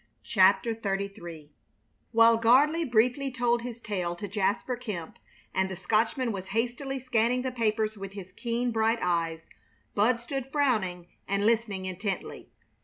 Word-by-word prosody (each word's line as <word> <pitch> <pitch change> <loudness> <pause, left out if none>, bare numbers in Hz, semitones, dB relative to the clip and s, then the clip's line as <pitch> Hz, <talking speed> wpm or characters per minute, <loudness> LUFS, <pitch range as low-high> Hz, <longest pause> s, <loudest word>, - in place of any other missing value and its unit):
CHAPTER 195 +2 +4
XXXIII 195 -7 -5 0.6
While 230 0 +6
Gardley 290 +8 +5
briefly 250 +4 +2
told 240 -1 +1
his 240 -1 -6
tale 180 -6 -3
to 205 +4 -6
Jasper 205 +5 0
Kemp, 210 -9 -6 0.3
and 190 0 +1
the 190 - -5
Scotchman 230 - +1
was 190 -2 -5
hastily 250 +4 -1
scanning 250 -1 +1
the 260 - -2
papers 215 -3 0
with 195 0 -7
his 195 -2 -9
keen, 240 0 -2
bright 225 +1 +2
eyes, 165 -2 -1 0.5
Bud 230 +4 +3
stood 270 +2 -5
frowning 215 - 0 0.2
and 200 +1 0
listening 215 -4 +1
intently. 190 +1 -4
220 Hz, 140 wpm, -28 LUFS, 195-245 Hz, 0.6 s, While